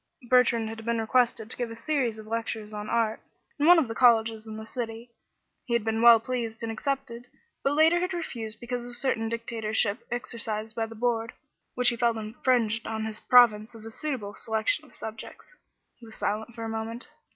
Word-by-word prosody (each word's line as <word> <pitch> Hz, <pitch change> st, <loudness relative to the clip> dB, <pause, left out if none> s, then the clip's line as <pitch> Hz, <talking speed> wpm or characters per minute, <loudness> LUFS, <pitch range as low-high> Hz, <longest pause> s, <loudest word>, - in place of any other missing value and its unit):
Bertrand 240 Hz, -3 st, +4 dB
had 225 Hz, 0 st, -7 dB
been 235 Hz, 0 st, 0 dB
requested 225 Hz, -1 st, +1 dB
to -, -, -2 dB
give 245 Hz, -2 st, -2 dB
a 230 Hz, -, -7 dB
series 240 Hz, -2 st, -1 dB
of 215 Hz, -, -10 dB
lectures 220 Hz, -1 st, -4 dB
on 210 Hz, 0 st, -5 dB
art 225 Hz, -2 st, 0 dB, 0.4 s
in 295 Hz, -, +3 dB
one 355 Hz, 0 st, +9 dB
of 315 Hz, -6 st, +3 dB
the 225 Hz, -, -4 dB
colleges 225 Hz, -2 st, +3 dB
in 215 Hz, 0 st, -7 dB
the 220 Hz, -, -7 dB
city. 230 Hz, 0 st, -6 dB, 0.6 s
He 240 Hz, -, -1 dB
had 235 Hz, -, +1 dB
been 220 Hz, 0 st, 0 dB
well 235 Hz, -1 st, +9 dB
pleased 230 Hz, -2 st, -4 dB
and 225 Hz, -, -2 dB
had -, -, -5 dB
accepted, 265 Hz, -4 st, -3 dB, 0.4 s
but 275 Hz, -, +2 dB
later 320 Hz, +3 st, +5 dB
had 365 Hz, +1 st, -1 dB
refused 235 Hz, -11 st, -5 dB
because 245 Hz, 0 st, -4 dB
of 245 Hz, -, -6 dB
certain 235 Hz, -3 st, 0 dB
dictatorship 225 Hz, -2 st, -1 dB
exercised 225 Hz, -2 st, -3 dB
by 225 Hz, -1 st, -1 dB
the 225 Hz, -, -11 dB
Board, 230 Hz, 0 st, -1 dB, 0.4 s
which 250 Hz, -1 st, +5 dB
he 240 Hz, -, -1 dB
felt 235 Hz, -1 st, +2 dB
infringed 230 Hz, 0 st, 0 dB
on 220 Hz, 0 st, -3 dB
his 220 Hz, -1 st, -4 dB
province 230 Hz, -3 st, +5 dB
of 220 Hz, -1 st, -12 dB
a 225 Hz, -, -7 dB
suitable 245 Hz, -7 st, -3 dB
selection 220 Hz, +8 st, 0 dB
of 260 Hz, -, -17 dB
subjects. 220 Hz, -, -9 dB, 0.4 s
He 235 Hz, -, -14 dB
was 220 Hz, -, -11 dB
silent 220 Hz, +3 st, -3 dB
for 230 Hz, -, -6 dB
a -, -, -3 dB
moment. 225 Hz, +2 st, -4 dB
230 Hz, 205 wpm, -27 LUFS, 220-245 Hz, 0.6 s, one